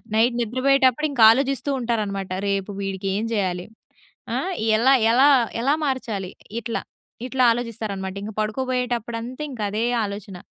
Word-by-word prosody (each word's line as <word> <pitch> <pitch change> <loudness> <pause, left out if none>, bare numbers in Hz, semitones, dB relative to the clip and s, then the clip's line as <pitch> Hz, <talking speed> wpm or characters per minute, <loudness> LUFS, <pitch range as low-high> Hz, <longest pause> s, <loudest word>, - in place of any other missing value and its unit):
Night 235 +2 +3
నిద్రపోయేటప్పుడు 260 +4 +2
ఇంకా 245 -5 +3
ఆలోచిస్తూ 275 +3 0
ఉంటారనమాట. 205 -5 -2 0.2
రేపు 195 0 -1
వీడికేం 195 +2 -2
చేయాలి, 185 -4 -1 0.7
ఆ! - - +1 0.4
ఎలా, 260 +4 +5 0.2
ఎలా, 260 +4 +6 0.3
ఎలా 275 +4 +3
మార్చాలి, 225 -8 -3 0.3
ఇట్లా, 230 0 -3 0.5
ఇట్లా 255 0 +1
ఆలోచిస్తారన్నమాట. 210 -5 -4
ఇంక 215 - -5
పడుకోబోయేటప్పుడంతింక 245 +2 -3
అదే 215 +3 -1 0.2
ఆలోచన. 200 -2 -7
230 Hz, 115 wpm, -23 LUFS, 200-255 Hz, 0.7 s, ఎలా